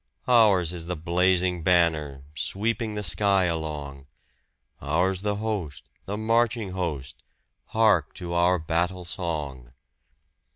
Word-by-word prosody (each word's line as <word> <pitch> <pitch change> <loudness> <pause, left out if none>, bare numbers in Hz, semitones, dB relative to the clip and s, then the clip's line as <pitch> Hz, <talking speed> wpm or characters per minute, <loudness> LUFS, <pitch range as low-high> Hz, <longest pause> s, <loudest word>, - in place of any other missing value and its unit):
Ours 100 -8 +4
is 85 -2 -5
the 90 - -2
blazing 90 +2 +1
banner, 80 -5 +1
sweeping 110 +6 -2
the 105 - -3
sky 100 +3 +3
along! 75 -5 -4 0.7
Ours 90 +6 0
the 105 0 -1
host, 100 -9 -4 0.2
the 100 +2 -4
marching 115 -1 +1
host 75 -8 -4 0.5
hark 110 -10 +2
to 85 -1 -6
our 90 +1 +3
battle 85 +3 -2
song! 75 -8 -4
90 Hz, 115 wpm, -25 LUFS, 80-100 Hz, 0.7 s, Ours